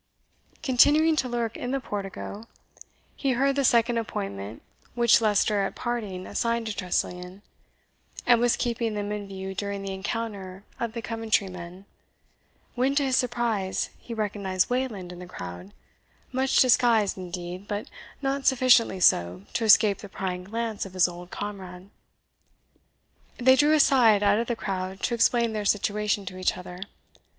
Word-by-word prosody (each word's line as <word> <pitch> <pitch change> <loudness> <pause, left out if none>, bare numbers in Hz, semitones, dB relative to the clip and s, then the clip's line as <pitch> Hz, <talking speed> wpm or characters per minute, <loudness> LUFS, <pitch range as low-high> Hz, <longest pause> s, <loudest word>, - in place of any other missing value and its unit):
Continuing 305 +4 +5
to 260 -4 0
lurk 235 -2 -2
in 245 - -4
the 270 +1 0
portico, 205 -1 -6 0.7
he 270 -2 0
heard 275 +3 +1
the 280 - +1
second 235 -1 +3
appointment 100 - -5 0.3
which 235 -1 +5
Leicester 210 -1 +2
at 195 - -2
parting 210 -7 -4
assigned 235 -1 -1
to 220 -2 -3
Tressilian; 180 +1 -3 0.8
and 240 -1 +5
was 240 -1 +3
keeping 230 -2 -1
them 205 0 -3
in 205 -1 -4
view 190 0 -6
during 200 0 -4
the 195 -1 -4
encounter 195 -2 -5 0.2
of 230 -2 -3
the 230 -1 -5
Coventry 225 -3 0
men, 180 +1 -10 0.9
when, 260 +3 +1
to 285 - +3
his 265 -2 +1
surprise, 235 -6 -1
he - - -12
recognized 205 -3 -1
Wayland 230 -8 -2
in 175 - -10
the 180 - -9
crowd, 90 - -8 0.6
much 265 +1 +1
disguised, 235 -5 +4
indeed, 180 +1 -7
but 205 0 -4 0.4
not 270 0 -1
sufficiently 245 -6 +4
so 90 - +3
to 230 - 0
escape 210 -1 +5
the 205 - -10
prying 180 -1 -4
glance 225 +1 -3
of 190 -1 -9
his 185 - +4
old 175 0 -9
comrade. 190 -2 -7 1.5
They 260 +1 +5
drew 295 +3 +4
aside 245 -8 +5
out 205 +1 +4
of 235 - -2
the 240 - -1
crowd 190 -2 -4
to - - 0
explain 235 0 +2
their 210 -1 -2
situation 210 0 0
to 185 0 -7
each 185 - 0
other. 180 0 -9
210 Hz, 155 wpm, -26 LUFS, 190-240 Hz, 1.5 s, Continuing